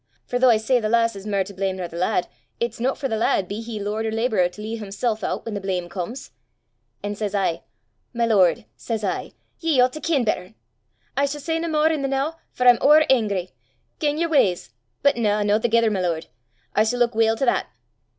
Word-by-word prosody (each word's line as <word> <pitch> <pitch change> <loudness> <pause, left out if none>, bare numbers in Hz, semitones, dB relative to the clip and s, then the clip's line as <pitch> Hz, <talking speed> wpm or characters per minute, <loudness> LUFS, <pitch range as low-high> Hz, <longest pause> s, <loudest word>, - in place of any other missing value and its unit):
For 245 - -2
though 255 0 +6
I 230 - +6
say 245 +4 +2
the 215 -2 -2
lass 230 -1 +2
is 195 +1 -8
mair 200 -2 +1
to 200 +2 -11
blame 190 0 -2
nor 180 -2 -4
the 170 - -12
lad, 180 +1 0 0.3
it's 235 -1 -2
no 260 +3 0
for 270 - -3
the 225 - -2
lad, 200 -4 +1
be 205 +4 -5
he 225 -2 -6
lord 210 +2 -2
or - - -2
labourer, 220 -5 +1
to 180 - -15
lea' 220 +2 -4
himsel' 215 +2 -2
oot - - -2
whan 225 - -4
the 200 - -3
blame 180 -2 -2
comes. 195 +9 -6 0.7
An' 205 0 -2
says 205 -1 -3
I, 190 -4 0 0.5
'My 235 -1 0
lord,' 185 - +3
says 215 - -4
I, 195 - -3 0.3
'ye 320 -5 +1
oucht 250 0 +4
to 310 - -7
ken 300 -6 +1
better! 210 -2 -2 0.6
I 280 - +2
s' 285 0 -5
say 325 0 -1
nae 335 - -2
mair 315 0 +2
i' 310 -3 -1
the 275 - 0
noo, 275 +3 0 0.2
for 250 - 0
I'm 245 -1 +7
ower 300 +2 +7
angry. 200 -8 +1 0.5
Gang 295 0 0
yer 335 +1 +1
w'ys 195 - +2 0.3
but 280 -3 +4
na! 210 -2 +1
no 205 +1 +2
thegither, 230 -1 +2
my 195 -3 -1
lord! 170 -3 -1 0.5
I 210 - +4
s' 220 +2 +2
luik 240 -1 +2
weel 225 0 +3
to 270 - 0
that! 240 - +1
220 Hz, 230 wpm, -23 LUFS, 200-255 Hz, 0.7 s, I'm